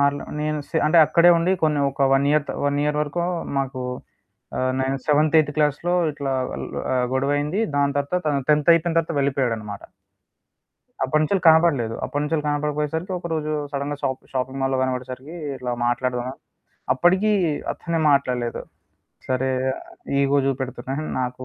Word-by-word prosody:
మారలే 140 0 +1 0.2
నేను 155 0 -1
స - - -25 0.2
అంటే 160 +3 +5
అక్కడే 170 +2 +5
ఉండి 170 +3 +2
కొన్ని 150 -2 +2 0.3
1 135 +1 +2
ఇయర్, 150 -1 +3
త - - -1 0.2
1 145 0 0
ఇయర్ 150 0 0
వరకు 150 +4 -2 0.4
మాకు 135 -1 -3 0.8
ఆహ్, 130 0 0
నేను 135 +1 0
సెవెన్త్, 150 +1 +3
ఎయిత్ 150 -2 +2
క్లాస్‌లొ 155 +4 +1 0.2
ఇట్లా 140 -2 -3 0.6
ఆహ్, 125 -1 +1
గొడవైంది. 145 +7 0 0.2
దాని 140 -1 +2
తర్వాత 155 +5 -2 0.2
10థ్ 150 +2 +4
అయిపోయిన 165 0 +1
తర్వాత 165 0 -1
వెళ్ళిపోయాడనమాట. 120 -7 -1 1.2
అప్పటినుంచెల్లి 155 +7 +1
కనపడలేదు. 160 -9 +4
అప్పటినుంచెల్లి 150 +1 -1
కనపడిపోయేసరికి 150 +4 -2
ఒకరోజు 160 -3 -3 0.2
సడెన్‌‌గా 140 +1 -3
షాప్‌, 130 -2 -1
షాపింగ్ 130 +1 -3
మాల్ 135 0 0
లో - - 0
కనపడేసరికి 130 +3 -4 0.2
ఇలా 125 -1 -4
మాట్లాడదామా 125 +1 -1 0.6
అప్పటికి 185 +9 +3 0.4
అతనే 170 -1 -3
మాట్లాడలేదు. 125 -4 0 0.7
సరే 130 0 0 0.7
ఈగో 140 +1 +3
చూపెడుతున్నడు. 130 +1 -3 0.2
నాకు 125 0 -4
145 Hz, 135 wpm, -23 LUFS, 130-155 Hz, 1.2 s, అంటే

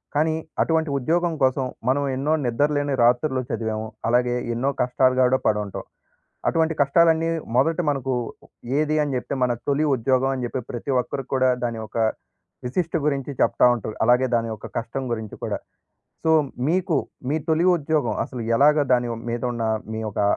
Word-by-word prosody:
కానీ, 155 +1 +2 0.3
అటువంటి 160 -2 +1
ఉద్యోగం 170 +5 +1
కోసం, 130 0 +2 0.2
మనం 140 +2 +2
ఎన్నో 145 +4 0
నిద్రలేని 145 +3 +1
రాత్రులు 130 +3 +2
చదివాము. 110 -1 -3 0.2
అలాగే 125 0 +2 0.2
ఎన్నో 130 +4 0
కష్టాలు 130 +1 +2
గూడ 130 +1 +4
పడి 105 -1 +2
ఉంటాం. 100 - -7 0.6
అటువంటి 160 0 +2
కష్టాలన్నీ 165 +3 +4 0.3
మొదట 160 +7 +2
మనకు 135 -2 -1 0.7
ఏది 155 0 +1
అని 145 -3 -2
చెప్తే, 125 - -3
మన 125 - +2 0.2
తొలి 145 +2 +2
ఉద్యోగం 130 +2 +1
అని 130 - -4
చెప్పి 125 +2 -3
ప్రతి 120 +3 -6
ఒక్కరు 135 +2 -5
కూడా 130 -1 +3
దాని 115 -2 -2
యొక్క 110 +1 -8 0.7
విశిష్ట 165 +7 -2
గురించి 140 -1 -1
చెప్తా - - +4
ఉంటారు. 110 -1 -6
అలాగే 125 +3 +4
దాని 115 -1 0
యొక్క 110 - -8
కష్టం 120 +3 -3
గురించి 110 -2 -4
కూడా. - - -1 0.7
సో, 160 - +3 0.4
మీకు, 180 -1 +1 0.3
మీ 150 - +1
తొలి 160 +2 +2
ఉద్యోగం 150 -5 0
అసలు 125 -3 -6
ఎలాగా 150 +2 +5
దాని 120 -1 0 0.2
మీద 120 0 -3
ఉన్న 115 -1 -2 0.3
మీ 110 - -3
యొక్క 105 - -2
130 Hz, 160 wpm, -23 LUFS, 120-150 Hz, 0.7 s, ఎలాగా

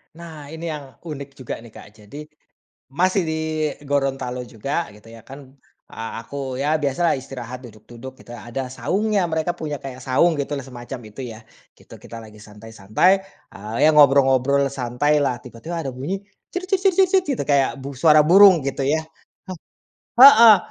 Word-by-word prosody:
Nah, 160 -4 -11
ini 160 +1 -7
yang 145 -6 -8
unik 145 -4 -8
juga 130 - -5
nih, 115 - -14
Kak. - - -13 0.2
Jadi, 145 +9 -10 0.7
masih 185 +5 +1
di 160 0 -3 0.5
Gorontalo 135 -3 -2
juga, 140 +8 -4
gitu 105 +2 -17
ya, 115 -1 -14
kan. 135 +1 -13 0.3
A 115 0 -7
aku, 130 +1 -6
ya 150 +3 +1
biasalah, 155 +3 0
istirahat, 125 -1 -8
duduk-duduk, 120 +3 -12
gitu, 120 - -11
ada 120 +3 -6
saungnya, 200 +9 -1
mereka 165 +1 -2
punya 150 -3 -5
kayak 130 -1 -9
saung, 160 +6 +2
gitu 145 0 -4
lah, 145 - -2
semacam 120 0 -8
itu, 120 +5 -8
ya, 110 - -12 0.3
gitu. - - -16
Kita 115 - -11
lagi 110 -1 -14
santai-santai, 105 - -1 0.4
eee, 105 +3 -7
ya - - +6
ngobrol-ngobrol 140 -1 +4
santai, 135 +3 -1
lah. 135 -4 0
Tiba-tiba 160 +8 -7
ada 145 - -5
bunyi, 170 +10 -4 0.3
cir 365 +1 -5
cit 390 - +3
cit 390 - +5
cit 375 +1 +3
cit, 375 0 +2
gitu, 280 -7 -3
kayak 140 -1 +1
bu 140 +1 -8
suara 155 +3 +5
burung, 185 +3 +7
gitu 140 0 -3
ya 150 +4 +1 1.1
he 245 - +5
heeh! 230 -6 +10
140 Hz, 170 wpm, -21 LUFS, 125-160 Hz, 1.1 s, heeh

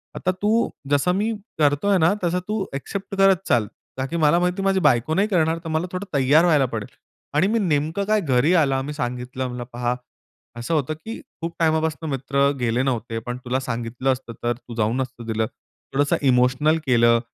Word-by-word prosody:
आता 185 - 0
तू 220 +3 +2 0.2
जसं 145 +5 +3
मी 210 +3 0 0.3
करतोय 150 +7 +3
ना, 165 +2 +4
तसं 175 +1 +1
तू 210 -1 -1
अ‍ॅक्सेप्ट 195 +9 -5
करत 195 -1 +5
चाल. 115 -4 +2 0.3
का 130 - -1
की 160 - -5
मला 155 +3 +4
माहिती 180 +2 0
माझी 195 -1 +2
बायको 145 -3 +2
नाही 200 +4 +3
करणार 165 -5 +1
तर 165 - -5
मला 160 +2 0
थोडं 185 +2 -4
तयार 140 +3 +4
व्हायला 150 -6 +4
पडेल 110 -2 -3 0.5
आणि 165 +6 +4
मी 230 - +2
नेमकं 160 0 0
काय, 215 +1 +2
घरी 140 +1 +2
आला 135 -5 +3
मी 145 +3 -5
सांगितलं 125 -1 -3
म्हणला, 125 0 -5
"पहा, 120 0 -1 0.6
असं 120 +8 -3
होतं 155 -1 0
की 220 +9 -8 0.2
खूप 165 0 -4
टाईमापासून 160 0 0
मित्र 140 +1 +1
गेले 120 +1 +1
नव्हते, 115 -3 -2
पण 120 +2 -5
तुला 125 +1 0
सांगितलं 120 +1 -2
असतं, 125 -2 -8
तर 120 0 +1
तू 120 -2 -11
जाऊ 110 0 +1
नसतं 130 -2 -4
दिलं." 110 0 0 0.5
थोडंसं 145 +1 +2
इमोशनल 130 +5 +3
केलं, 120 -2 +4
145 Hz, 190 wpm, -23 LUFS, 125-170 Hz, 0.6 s, करत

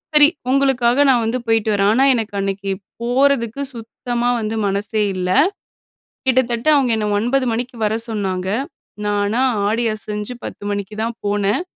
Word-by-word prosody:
சரி, 290 -1 +8 0.2
உங்களுக்காக 270 -1 +3
நான் 240 -3 +4
வந்து 240 +3 -1
போயிட்டு 225 -1 +2
வரேன். 200 0 +3
ஆனா 265 +3 +3
எனக்கு 220 -3 -3
அன்னைக்கு 195 0 -2 0.3
போறதுக்கு 255 0 +1
சுத்தமா 240 +1 -3
வந்து 220 0 -3
மனசே 210 +2 -1
இல்ல. 180 0 -2 1.0
கிட்டத்தட்ட 245 0 +1
அவங்க 265 -4 +2
என்னை 210 -1 -1
9:00 255 +4 +1
மணிக்கு 245 +2 -4
வர 210 - +1 0.2
சொன்னாங்க. 190 -4 -2 0.6
நானா 205 +3 0 0.3
ஆடி 230 +3 0
அசஞ்சு 210 +2 -5
10:00 - - -8
மணிக்கு 205 +1 -4
தான் 230 0 -3
போனேன். 205 - +1
225 Hz, 145 wpm, -19 LUFS, 205-250 Hz, 1.0 s, சரி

